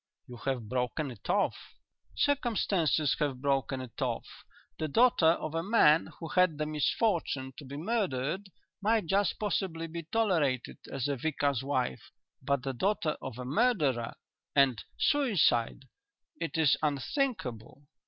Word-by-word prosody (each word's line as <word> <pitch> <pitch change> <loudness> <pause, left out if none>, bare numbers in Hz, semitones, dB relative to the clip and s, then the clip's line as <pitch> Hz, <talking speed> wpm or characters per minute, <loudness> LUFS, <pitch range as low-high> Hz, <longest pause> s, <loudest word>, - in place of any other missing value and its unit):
"You 125 - -10
have 130 -5 -1
broken 130 +4 -2
it 115 - -12
off?" - - 0 0.4
"Circumstances 200 - +2
have 140 -4 -1
broken 135 -1 0
it 125 -3 -9
off. - - -1 0.5
The 155 - -1
daughter 230 - +4
of 160 -1 +1
a 165 - 0
man 165 -6 +4
who 165 - -6
had 180 -4 +3
the 150 - -1
misfortune 150 -3 0
to 145 - -9
be 140 +2 -7
murdered 185 - -1 0.3
might 220 -1 +2
just 195 +4 +1
possibly 190 -5 -2
be 165 -1 -7
tolerated 165 - +1
as 135 -2 -2
a 140 - 0
vicar's 140 -2 0
wife, 130 - -2 0.3
but 135 0 0
the 135 - -2
daughter 170 - 0
of 130 -3 -6
a 125 - -6
murderer 145 - +1 0.4
and 135 -6 +4
suicide 195 - +2 0.6
it 165 -1 -3
is 155 -3 +4
unthinkable! 145 - -2
150 Hz, 140 wpm, -30 LUFS, 130-190 Hz, 0.6 s, daughter